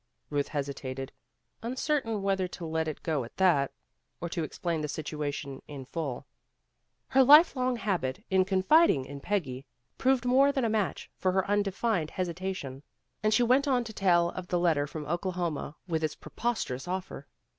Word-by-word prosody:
Ruth 145 -1 0
hesitated, 135 -2 -4 0.5
uncertain 240 -3 -1
whether 195 -2 +1
to 175 -1 -8
let 160 0 -1
it 155 - -5
go 155 -5 0
at 115 - -12
that, 170 -8 +4 0.5
or 170 - -4
to 170 0 -2
explain 165 +1 -2
the 150 - -2
situation 145 -2 -4
in 140 -3 -8
full. 140 -3 -4 0.8
Her 265 0 +5
life 300 +6 +8
long 255 -1 +1
habit 185 - -2
of 190 0 +4
confiding 190 - +4
in 140 +1 -8
Peggy 135 -8 -2 0.4
proved 260 -1 +2
more 270 +3 +5
than 270 -3 0
a - - +1
match 215 -3 -1
for 185 - +2
her 190 0 +1
undefined 205 -3 0
hesitation, 180 -7 -4 0.4
and 215 +1 +2
she 220 +3 +4
went 260 +4 +3
on 255 -3 +2
to 225 -1 -8
tell 175 -4 +3
of 185 -1 -7
the 180 - 0
letter 160 -5 +2
from 150 0 -6
Oklahoma 175 -2 -2
with 160 -2 -1
its 155 - -1
preposterous 220 - -3
offer. 180 -6 -5
180 Hz, 165 wpm, -29 LUFS, 150-215 Hz, 0.8 s, life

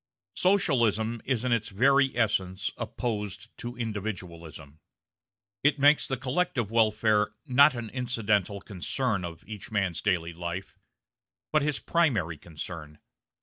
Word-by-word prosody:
Socialism 120 - +2
is 130 -2 0
in 125 - 0
its 115 -2 +1
very 135 +6 +3
essence 95 -4 0
opposed 105 -2 -4
to 120 +1 -6
individualism. 90 - -6 0.8
It 145 0 +4
makes 145 +2 +5
the 130 - -2
collective 130 - -1
welfare 105 -2 +2
not 140 +2 +6
an 115 -2 -5
incidental 105 -6 0
concern 105 +1 -2
of 85 -1 -7
each 105 -2 -8
man's 100 -6 -1
daily 85 -4 0
life, 85 +2 -6 0.7
but 155 - +4
his 150 0 0
primary 110 - +1
concern. 80 -2 -8
110 Hz, 120 wpm, -28 LUFS, 95-125 Hz, 0.8 s, not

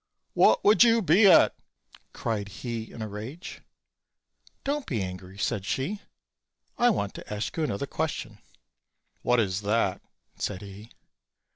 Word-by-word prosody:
"What - - +4
would 215 +3 +7
you 230 -1 +4
be 190 +5 +6
at?" 180 - +7 0.6
cried 105 -3 -3
he 115 +1 -6
in 115 - -7
a - - -4
rage. 110 - -8 1.0
"Don't 285 0 -2
be 115 - -1
angry," 90 +1 -8
said 100 -1 -1
she; 135 - -2 0.8
"I 245 - +4
want 100 - -1
to - - -10
ask 105 0 -3
you 160 - -1
another 140 -3 -2
question." 135 -8 -4 0.8
"What 125 0 +2
is 95 -3 0
that?" 105 -2 0 0.4
said 100 -1 -4
he. 100 +3 -11
110 Hz, 140 wpm, -27 LUFS, 100-160 Hz, 1.0 s, would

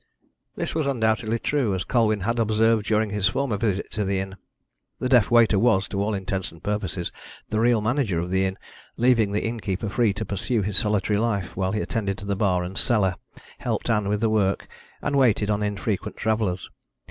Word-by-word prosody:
This - - -3
was 155 -3 0
undoubtedly 110 -3 +1
true, 120 -5 0
as 95 - -2
Colwyn 110 -3 +1
had 115 +5 -1
observed 110 0 +2
during 110 -1 +1
his 105 -1 +1
former 130 0 0
visit 100 -2 -1
to 105 - -1
the 100 0 0
inn. 95 0 -5 0.6
The 130 - -2
deaf 125 -5 +5
waiter 115 -4 +5
was, 105 -4 +3
to 100 - -2
all 105 +1 0
intents 95 -1 -3
and 85 - -16
purposes, 100 -4 -2 0.4
the 110 - 0
real 115 -1 +3
manager 110 -4 0
of 85 +2 -2
the 95 0 +2
inn, 95 0 -3 0.4
leaving 115 -4 +3
the 105 - -1
innkeeper 110 -3 -3
free 115 +1 +2
to 100 - -4
pursue 105 +2 -1
his 100 0 -3
solitary 105 -1 +1
life 100 -5 -1
while 95 +1 -1
he 105 - 0
attended 100 -4 -2
to 100 - -8
the 100 0 -1
bar 95 -3 +1
and 90 +2 -6
the - - +2
cellar, 105 -6 +2 0.5
helped - - -1
Ann 105 -2 +1
with 105 0 0
the 115 - +2
work, 100 -3 +1 0.4
and 145 - 0
waited 110 -5 +3
on 105 0 0
infrequent 105 0 -2
travellers. 105 -4 -1
105 Hz, 205 wpm, -24 LUFS, 95-115 Hz, 0.6 s, deaf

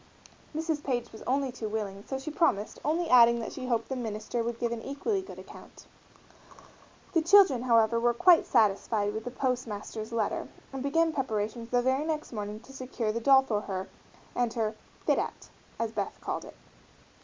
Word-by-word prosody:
Mrs. 315 -1 -1
Page 245 -3 -2
was 220 - -11
only 270 0 +1
too 230 -3 -5
willing, 205 -2 -4
so 265 - -2
she 270 +4 -6
promised, 240 - +1
only 330 +3 0
adding 235 -3 +7
that 230 - -5
she 255 -2 -6
hoped 230 -2 0
the 265 - -3
minister 225 -1 -3
would 235 0 -3
give 235 0 -1
an 235 -1 -3
equally 335 - -2
good 375 - -11
account. - - -13 1.3
The 330 - +4
children, 335 -7 +6
however, 230 -2 +3
were 240 0 +2
quite 355 +4 +6
satisfied 210 -2 +2
with 220 +1 -5
the - - -2
postmaster's 235 -4 -3
letter 225 -3 -1 0.3
and 270 - -4
began 325 +4 +2
preparations 230 -4 -2
the 245 0 +2
very 260 +3 +2
next 310 -4 -3
morning 210 -1 -4
to 265 +3 -14
secure 255 -4 -3
the 230 - -2
doll 265 +2 +6 0.9
and 245 -2 +1
her 220 -2 -1 0.3
"fit - - +3
out" - - -5 0.3
as 230 -1 -2
Beth 205 -3 -3
called - - -4
it. - - -12
240 Hz, 180 wpm, -29 LUFS, 220-275 Hz, 1.3 s, adding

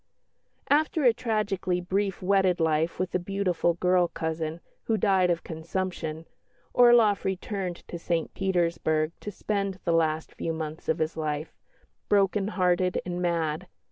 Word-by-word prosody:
After 310 +1 +3
a 245 -3 +6
tragically 210 -6 -1
brief 190 +1 -1
wedded 190 -2 +3
life 160 0 +1
with 185 0 -2
a 180 - +2
beautiful 180 -3 0
girl 180 0 +3
cousin, 160 0 -3 0.3
who 225 - +1
died 190 -4 +3
of 170 -1 0
consumption, 165 -1 -4 0.5
Orloff 240 -4 +5
returned 190 -1 -3
to 170 - -6
St 165 -1 -2
Petersburg 170 -4 0
to - - -6
spend 200 -1 -2
the 170 - +2
last 160 -1 +1
few 165 - -3
months 160 -1 -6
of 160 - +2
his 160 0 -1
life, 155 0 -3 0.6
"broken 200 0 +3
hearted 180 -2 +1
and 175 0 -3
mad." 170 -1 -1
180 Hz, 140 wpm, -27 LUFS, 165-195 Hz, 0.6 s, a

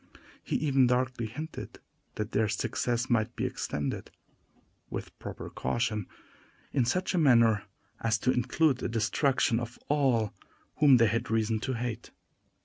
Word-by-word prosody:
He - - -3
even 135 -4 +3
darkly 125 -1 0
hinted 155 +8 -7 0.4
that 105 -1 -3
their 110 +1 +2
success 120 +3 -1
might 115 -1 +1
be - - -1
extended, 70 -1 -3 0.8
with - - -6
proper - - -7
caution, 105 - -1 0.6
in 130 -4 +2
such 185 +11 0
a 180 - +2
manner 115 -8 +5 0.3
as 110 -1 +1
to 130 - +3
include 130 +3 +2
the - - -2
destruction 115 +2 +1
of 120 0 -6
all 130 -7 +2 0.4
whom 140 -4 +7
they 115 - +5
had 115 +3 0
reason 110 0 +1
to 130 +4 -2
hate. 120 -1 -4
120 Hz, 140 wpm, -29 LUFS, 110-130 Hz, 0.8 s, whom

